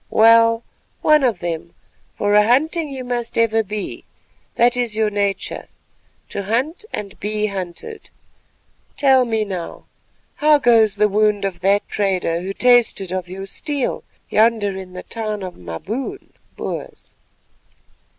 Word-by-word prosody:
Well, 230 +1 +5 0.4
one 305 -2 +5
of 235 -8 +1
them, 170 -1 -4 0.4
for 205 0 +1
a 210 0 +5
hunting 310 +6 +2
you 265 -2 -6
must 240 -1 -4
ever 225 -1 +3
be; 210 -1 -5 0.5
that 240 +1 +4
is 240 -3 -1
your 215 -1 +1
nature, 200 -1 -2 0.6
to 200 - -4
hunt 255 - -1
and 200 -2 -6
be 210 0 -1
hunted. 200 - -6 0.9
Tell 265 -3 +4
me 220 -2 0
now, 185 -4 -6 0.5
how 300 0 +5
goes 225 -6 +4
the 210 +1 +3
wound 210 0 +1
of 185 -3 -3
that 200 +2 +2
trader 185 -4 0
who 190 +2 -4
tasted 235 -5 +3
of 185 -1 -3
your 190 +1 -6
steel 285 +6 -3 0.2
yonder 215 -3 +2
in 190 -1 -8
the 180 - -7
town 215 -3 -4
of 185 -1 -6
the - - -20
Maboon 220 - -6 0.2
(Boers)? - - -7
215 Hz, 140 wpm, -20 LUFS, 195-245 Hz, 0.9 s, Well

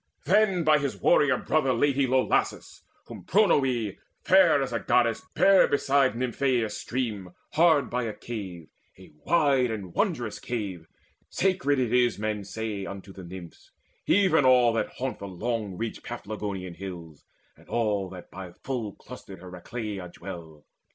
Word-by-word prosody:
Then 195 +1 +3
by 155 -1 +4
his 140 -2 -3
warrior 145 -5 +4
brother 135 -5 +1
laid 140 +3 +2
he 140 -1 +2
low 130 0 +3
Lassus, - - -1 0.2
whom - - -10
Pronoe, 135 - +2 0.3
fair 180 -6 +5
as 135 -3 -2
a 115 - 0
goddess, 115 +2 +2
bare 195 -1 +6
Beside 140 -2 +2
Nymphaeus' 125 -2 0
stream, 105 -7 -4 0.2
hard 160 -4 +4
by 125 0 -1
a 110 - -3
cave, 95 -8 -7 0.3
A - - -15
wide 140 -7 +3
and 100 -6 -5
wondrous 140 - -1
cave: 100 -9 -5 0.4
sacred 180 -7 +1
it 125 -3 0
is 120 -2 +3
Men 105 -1 -2
say, 105 0 -4
unto 100 0 -8
the 95 - -10
Nymphs, 85 -1 -11 0.4
even 185 -6 +4
all 125 -2 +5
that 115 - -2
haunt 130 0 -4
The 100 - -6
long 105 0 -3
ridged 115 -1 -5
Paphlagonian 100 -4 -5
hills, 85 -4 -9 0.3
and - - -21
all 105 -5 0
That 90 -1 -11
by 95 -2 -9
full 120 -6 -3
clustered 95 - -11
Heracleia 95 +1 -6
dwell. 85 -5 -10
115 Hz, 150 wpm, -27 LUFS, 95-135 Hz, 0.4 s, bare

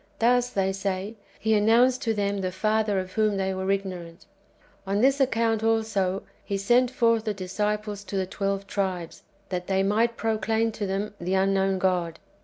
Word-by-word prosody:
'■'' - - -33
Thus, 245 +1 +3
they 195 -4 0
say. 195 +1 -3 0.3
He 220 +1 +1
announced 230 +5 +4
to 225 - 0
them 200 -1 -1
the 185 -1 -2
Father 215 +1 +1
of 185 0 -5
whom 215 -2 +1
they 190 0 0
Avere 190 +1 -1
ignorant. 180 -3 -8 0.6
On 200 +1 0
this 270 +4 +3
account, 230 -4 +1
also. 215 -4 0 0.2
He 200 - -2
sent 240 +5 +3
forth 230 -3 +2
the 215 -2 -1
disciples 210 +2 -3
to 195 +1 -4
the 190 - 0
twelve 195 +1 -2
tribes, 190 -4 -3 0.3
that 180 -1 -3
they 190 0 +2
might 225 +4 +1
proclaim 225 0 0
to 210 -2 -4
them 200 +2 -2
the 180 +2 0
unknown 195 0 +2
God. 180 -3 0
200 Hz, 180 wpm, -26 LUFS, 190-225 Hz, 0.6 s, announced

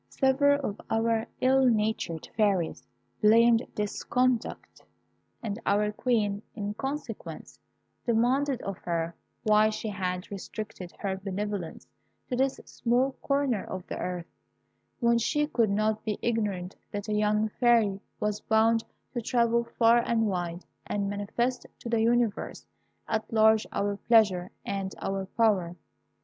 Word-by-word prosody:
"Several 285 +1 +3
of 205 - -6
our 225 0 +1
ill 265 +1 +4
natured 215 -8 +1
fairies 195 - +1 0.3
blamed 230 +2 +6
this 210 -1 -3
conduct, 250 -2 0 0.6
and 215 -1 -3
our 210 +1 +2
Queen, 210 -3 0
in 205 -1 -3
consequence, 275 +6 -6 0.4
demanded 250 +3 +1
of 195 -1 -4
her 170 -1 -2 0.3
why 215 0 +5
she 215 0 -4
had 185 -2 -3
restricted 200 -2 -6
her 195 -2 -2
benevolence 195 -2 -4 0.4
to 250 - -2
this 265 +1 +1
small 250 +3 +1
corner 275 -7 +1
of 185 -1 -6
the - - -5
earth, 180 -2 -3 0.7
when 235 -1 +3
she 295 +6 +1
could 235 -7 +1
not 215 +2 +1
be 210 -2 -2
ignorant 205 -6 -1
that 205 +1 -5
a 215 - -1
young 210 +1 +2
fairy 230 -5 +4 0.2
was 210 0 -1
bound 225 +1 +3 0.3
to 240 - -2
travel 235 0 +2
far 230 0 +6
and 230 -1 +1
wide, 175 -3 -2 0.2
and 200 -1 -1
manifest 235 +5 -2
to - - -9
the 230 -1 +2
universe 235 -2 +1 0.4
at 220 0 -2
large 220 -1 +4
our 200 0 -1
pleasure 200 -6 +3 0.2
and 195 -1 -3
our 195 0 -2
power. 195 -7 +2
215 Hz, 135 wpm, -28 LUFS, 200-235 Hz, 0.7 s, blamed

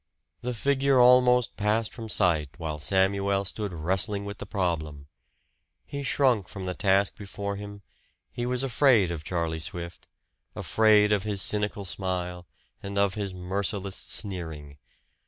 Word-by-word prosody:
The 125 0 -3
figure 140 +1 +2
almost 125 0 +5
passed 105 +2 0
from 115 -3 -8
sight 85 -8 +1
while 80 -3 -4
Samuel 100 +3 +1
stood 105 +1 -4
wrestling 95 +5 -1
with 100 0 -7
the - - -7
problem. 80 -7 -3 0.8
He 140 - -6
shrunk 125 -6 +1
from 95 -2 -8
the 90 - -2
task 95 +1 +2
before 100 0 -5
him; 100 0 -9 0.5
he 120 0 -4
was 125 +1 +1
afraid 125 -7 +3
of 80 -3 -5
Charlie 85 -1 -2
Swift, 85 +2 -6 0.5
afraid 105 -1 +3
of 105 - +1
his 105 -1 -1
cynical 105 -1 +1
smile, 90 -1 -4 0.3
and 100 0 -6
of 100 -1 +2
his 100 -3 -4
merciless 95 +2 -2
sneering. 80 -10 -2
100 Hz, 140 wpm, -27 LUFS, 90-110 Hz, 0.8 s, almost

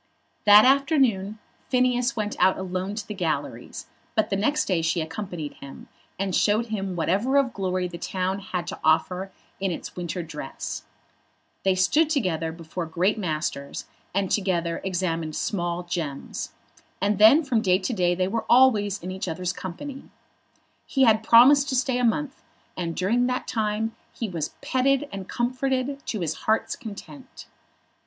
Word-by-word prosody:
That 210 +1 +9
afternoon 260 -7 +3 0.3
Phineas 250 0 +2
went 210 -2 -2
out 185 +1 +4
alone 190 +1 -3
to 215 -1 -4
the 210 - -4
galleries, 175 -6 -3 0.3
but 220 -2 +1
the - - +2
next 290 +10 +1
day 180 -4 +1
she 165 +2 0
accompanied 160 -1 -5
him, 140 - -11 0.3
and 195 -1 -2
showed 215 +2 +3
him 195 -4 -3
whatever 200 - +1
of 270 -3 +2
glory 185 -2 -1
the 170 -1 -8
town 185 +2 -2
had 185 -3 -4
to - - -6
offer 180 +4 +1 0.3
in 195 0 0
its 170 - -6
winter 175 0 -4
dress. 150 -4 -6 0.8
They 190 -1 +3
stood 295 - +3
together 180 - 0
before 165 +1 -6
great 180 +7 +1
masters, 155 -5 -3 0.3
and 195 -1 -1
together 175 -4 0
examined 165 -4 -2
small 175 -3 -2
gems. 165 -5 -4 0.5
And 200 +1 +1
then 235 +10 +8
from 250 -6 +1
day 185 -3 +3
to 200 +6 -3
day 175 -4 +2
they 185 +1 0
were 225 +3 -2
always 220 -6 +5
in 185 - -4
each 190 0 -4
other's 180 +2 -2
company. 260 +11 -7 0.8
He 270 - +2
had 220 -3 +5
promised 270 +6 +6
to 265 - 0
stay 255 0 +1
a - - 0
month, 270 +4 0 0.3
and 170 -2 -3
during 235 +7 +1
that 255 0 -2
time 220 0 -1 0.2
he 230 - -4
was 165 -6 -4
petted 275 +2 +1
and 195 -1 -6
comforted 260 +2 -1
to 215 - -2
his 165 - -1 0.2
heart's 220 - +1
content. 245 +5 -10
195 Hz, 160 wpm, -25 LUFS, 175-245 Hz, 0.8 s, That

